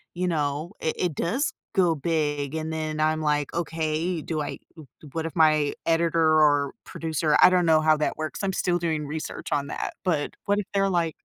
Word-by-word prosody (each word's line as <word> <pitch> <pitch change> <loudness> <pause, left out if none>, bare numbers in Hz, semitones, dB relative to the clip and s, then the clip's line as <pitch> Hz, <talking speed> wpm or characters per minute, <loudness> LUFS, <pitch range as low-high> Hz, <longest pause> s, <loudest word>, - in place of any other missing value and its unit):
you 180 +1 -1
know, 150 0 -1
i 160 - +1
it 175 -4 0
does 230 - -1 0.2
go 180 -3 +4
big?" 145 -1 -1
And 160 0 -3
then 155 -1 -3
I'm 155 0 +1
like, 150 -2 0
"Okay, 165 0 -1
do 155 -2 -2
I - - -4 0.2
u 150 -4 -12
do 150 - -12
what 165 0 -3
if 165 - -9
my 155 -3 +4
editor, 165 -1 +3
or 145 -2 +3
producer" 160 -1 -1
I - - +9
don't 180 -1 +3
know 155 -1 +5
how 155 0 +4
that 150 - -1
works, 155 +5 -4
I'm 190 -1 0
still 175 -1 0
doing 160 -3 -1
research 155 +2 -6
on 140 -1 0
that, - - -4
but 160 -6 0
what 205 0 +2
if 200 - -3
they're, 195 0 +2
like 170 -3 +1
160 Hz, 210 wpm, -25 LUFS, 150-170 Hz, 0.2 s, I